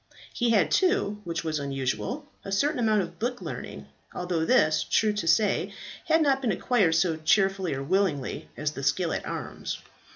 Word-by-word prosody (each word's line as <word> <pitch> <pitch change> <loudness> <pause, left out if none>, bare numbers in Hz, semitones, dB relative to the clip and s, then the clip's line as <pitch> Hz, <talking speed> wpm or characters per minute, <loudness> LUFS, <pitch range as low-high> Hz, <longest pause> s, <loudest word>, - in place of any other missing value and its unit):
He 240 -1 +1
had 220 -4 +3
too, 370 - +2
which 170 0 -3
was 155 -2 -1
unusual, 140 - -3 0.2
a 195 - -6
certain 280 +8 +1
amount 215 -4 +3
of 170 0 -10
book 245 +2 -2
learning, - - -7 0.3
although 175 -2 -1
this, 160 -11 +3
true 215 -1 +2
to 205 -5 -3
say, 195 +5 +2 0.3
had 320 0 +4
not 270 -2 +2
been 240 -5 +1
acquired 190 -3 +2
so 165 -1 +2
cheerfully 190 +1 +2
or 135 - -4
willingly 170 -4 -1
as 150 0 -1
the 140 - -7
skill 165 +5 +1
at - - -4
arms. - - -5
190 Hz, 175 wpm, -27 LUFS, 160-235 Hz, 0.3 s, had